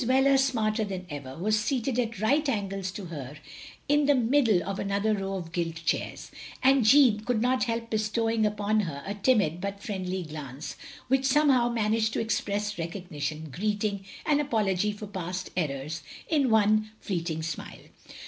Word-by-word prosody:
Wheler, 265 +2 +4
smarter 225 -5 +1
than 190 -3 -5
ever, 135 -2 -7
was 215 +5 +1
seated 250 +1 -1
at 230 -4 -2
right 280 +7 +2
angles 195 -5 -2
to 200 - -6
her 140 -1 -7 0.5
in 290 0 +3
the 290 - +5
middle 235 -7 +3
of 195 -1 -3
another 200 +2 +1
row 195 -1 -2
of 170 -3 -6
gilt 165 -1 -2
chairs, - - -2 0.3
and 265 -1 +5
Jeanne 240 -2 +6
could 225 +1 -1
not 250 +2 +2
help 230 -1 -3
bestowing 220 +1 +1
upon 210 0 +1
her 155 -8 -3
a 200 - -3
timid, 200 -6 +2
but 200 +1 -4
friendly 185 -3 -3
glance, 150 -2 -7 0.3
which 265 +1 +2
somehow 270 -3 +4
managed 220 -1 +1
to - - 0
express 210 -2 -1
recognition, 160 -3 -4
greeting, 205 +3 -1 0.2
and 295 -3 +3
apology 210 -7 +1
for 210 +1 -7
past 185 -2 -5
errors, 150 -1 -2 0.3
in 290 -5 +2
one 215 0 +3
fleeting 165 -4 -3
smile. 160 -2 -6
210 Hz, 160 wpm, -28 LUFS, 180-235 Hz, 0.5 s, Jeanne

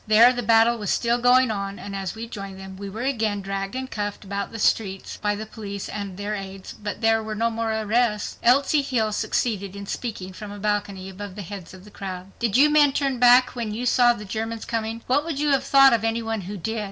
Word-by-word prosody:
There 225 +4 +7
the 245 - -2
battle 230 0 +4
was 205 - -3
still 235 0 +1
going 250 0 +5
on, 200 -1 -4
and 200 -1 -7
as 195 0 -4
we 225 +1 -5
joined 195 -4 -8
them 190 0 -9
we 200 +1 -7
were 220 +5 -5
again 220 -6 0
dragged 195 +2 -4
and 260 0 -3
cuffed 205 -1 -4
about 200 0 -4
the 230 - -6
streets 195 -3 0
by 210 0 0
the 215 +1 -5
police 200 -3 -7
and 200 -3 -6
their 205 +1 -3
aids, 195 -1 -7
but 205 +1 -6
there 225 0 +3
were 215 0 -5
no 230 +2 +1
more 225 0 -2
arrests. 220 0 0
Elsie 275 +4 +4
Hill 235 -6 0
succeeded 205 -2 -1
in 200 0 -7
speaking 195 -4 -5
from 205 +2 -8
a 205 - -8
balcony 200 -2 -2
above 195 0 -8
the 205 - -6
heads 195 -1 -8
of 185 +1 -13
the 210 - -14
crowd: 185 -1 -7
"Did 235 -2 +1
you 285 +3 +7
men 295 -2 +5
turn 270 -3 0
back 250 +1 +6
when 225 -3 -3
you 245 +3 -3
saw 245 0 +5
the 210 -3 -9
Germans 225 +3 -4
coming? 225 0 -3
What 275 +4 +2
would 320 -3 -4
you 295 0 +1
have 275 -2 +3
thought 275 -1 +6
of 225 -2 +1
any 225 +1 0
one 225 -1 -2
who 200 +3 -6
did? 220 +5 -3
215 Hz, 240 wpm, -24 LUFS, 200-235 Hz, -, There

